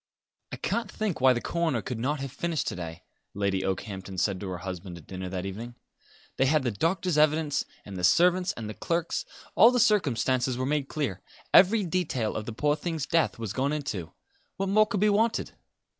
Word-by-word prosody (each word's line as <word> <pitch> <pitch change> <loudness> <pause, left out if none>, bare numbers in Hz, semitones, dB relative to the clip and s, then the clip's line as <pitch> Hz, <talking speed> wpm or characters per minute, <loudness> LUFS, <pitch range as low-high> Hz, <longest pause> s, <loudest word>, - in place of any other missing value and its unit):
"I - - -3
can't 235 -3 -2
think 210 -10 -2
why 130 0 +7
the 120 - +1
coroner 170 -1 -1
could 125 -3 -4
not 140 +4 -1
have 135 -2 -4
finished 160 +3 -2
to - - -5
day," 85 0 -7 0.3
Lady 100 -1 0
Okehampton 95 0 -4
said 95 0 0
to 100 - -5
her 90 - -4
husband 90 0 -6
at 80 - -14
dinner 95 -1 -6
that 90 0 -4
evening. 115 +5 -6 0.6
"They 135 - +3
had 150 0 +3
the 120 - 0
doctor's 165 - 0
evidence, 155 -1 +2 0.2
and 100 - -8
the 90 - -5
servants', 180 - +4
and 110 -2 -6
the 110 - -5
clerk's; 170 - -2 0.3
all 230 - +8
the 250 0 +1
circumstances 130 - +2
were 130 - -1
made 145 0 0
clear, 140 - -3 0.3
every 205 +3 +6
detail 165 - -1
of 110 - -4
the - - -3
poor 145 +6 +1
thing's 160 -2 -3
death 165 0 +1
was 110 -4 -4
gone 135 +4 0
into. 110 - -4 0.5
What 195 0 -1
more 215 +2 +5
could 205 -3 -2
be 210 - +5
wanted?" 220 +3 +1
135 Hz, 205 wpm, -28 LUFS, -, 0.6 s, all